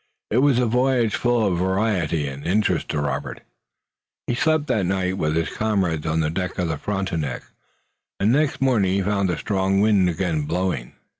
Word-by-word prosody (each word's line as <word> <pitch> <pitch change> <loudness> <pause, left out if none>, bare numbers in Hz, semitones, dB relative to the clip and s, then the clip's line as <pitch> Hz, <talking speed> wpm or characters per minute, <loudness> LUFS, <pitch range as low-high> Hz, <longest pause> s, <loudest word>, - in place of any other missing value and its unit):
It 115 - +3
was 140 -2 +4
a 125 - +2
voyage 125 -1 +2
full 120 -2 +1
of 90 -4 0
variety 95 -5 0
and 70 +1 -7
interest 105 +3 0
to 75 - -1
Robert. 75 -1 -3 0.8
He - - -1
slept 155 +4 +1
that 110 -10 0
night 95 0 -1
with 75 0 0
his 80 0 0
comrades 95 -8 0
on 80 +1 +1
the 75 0 0
deck 90 +2 -3
of 90 -2 -1
the 80 - -2
Frontenac, 85 -10 -3 0.8
and 105 +4 +3
the 140 - +4
next 150 -3 -1
morning 110 -8 +2
he 100 - +1
found 100 -1 0
a 85 - -1
strong 95 -1 0
wind 100 -3 +3
again 80 -3 -1
blowing. 90 -7 -2
95 Hz, 190 wpm, -22 LUFS, 85-110 Hz, 0.8 s, was